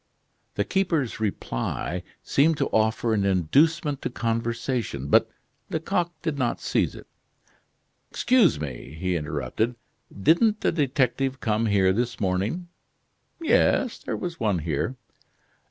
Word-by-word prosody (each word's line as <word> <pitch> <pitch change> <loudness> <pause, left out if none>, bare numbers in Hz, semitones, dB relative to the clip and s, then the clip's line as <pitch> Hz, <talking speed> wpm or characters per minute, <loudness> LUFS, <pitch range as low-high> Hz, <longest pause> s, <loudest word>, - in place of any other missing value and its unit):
The - - +1
keeper's 170 - 0
reply 90 - -2 0.2
seemed 155 +3 +3
to - - 0
offer 110 +1 +1
an 105 -2 +1
inducement 140 - +2
to - - -2
conversation, 115 - -2
but - - +5 0.4
Lecoq 170 +2 0
did 155 -4 -2
not 120 -3 0
seize - - 0
it. - - -11 1.0
"Excuse 245 - +3
me," 70 0 -6
he 90 0 0
interrupted, 75 - -2 0.4
"didn't 190 - +2
a - - +4
detective 135 -3 0
come 110 0 0
here 95 -2 +3
this 120 +3 -2
morning?" 100 - -1 0.7
"Yes, 280 -5 +2
there - - -4
was 175 -2 -5
one 105 -5 +1
here." 80 - -2
115 Hz, 120 wpm, -25 LUFS, 95-160 Hz, 1.0 s, but